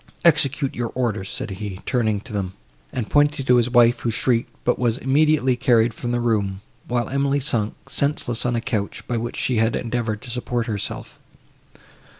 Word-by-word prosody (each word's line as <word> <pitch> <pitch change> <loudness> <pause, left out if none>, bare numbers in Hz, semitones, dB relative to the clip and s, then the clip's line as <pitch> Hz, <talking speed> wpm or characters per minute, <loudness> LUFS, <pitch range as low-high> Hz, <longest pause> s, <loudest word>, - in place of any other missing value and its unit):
"Execute 145 -4 +3
your 120 -2 -3
orders," 110 -6 -1
said 110 - -4
he, 95 -1 -6
turning 110 -5 0
to 105 - -11
them, 95 -2 -2 0.4
and 120 -4 -3
pointing 145 -2 +2
to 125 -1 +5
his 120 0 +2
wife, 120 -1 +5
who 120 - -1
shrieked, 115 +1 +1
but - - +1
was 120 -1 +1
immediately 140 -1 +3
carried 120 -2 +3
from 120 - -4
the 120 - 0
room; 105 -5 0 0.3
while 120 -2 0
Emily 140 +1 +1
sunk, 115 -6 0
senseless, 140 -5 0
on 120 -1 0
a 115 - 0
couch, 105 -4 -3
by 120 - -1
which 115 +1 -4
she 125 - 0
had 115 +1 +2
endeavoured 115 -3 -2
to 125 - -5
support 120 -1 -2
herself. 105 -4 -5
120 Hz, 180 wpm, -22 LUFS, 110-130 Hz, 0.4 s, to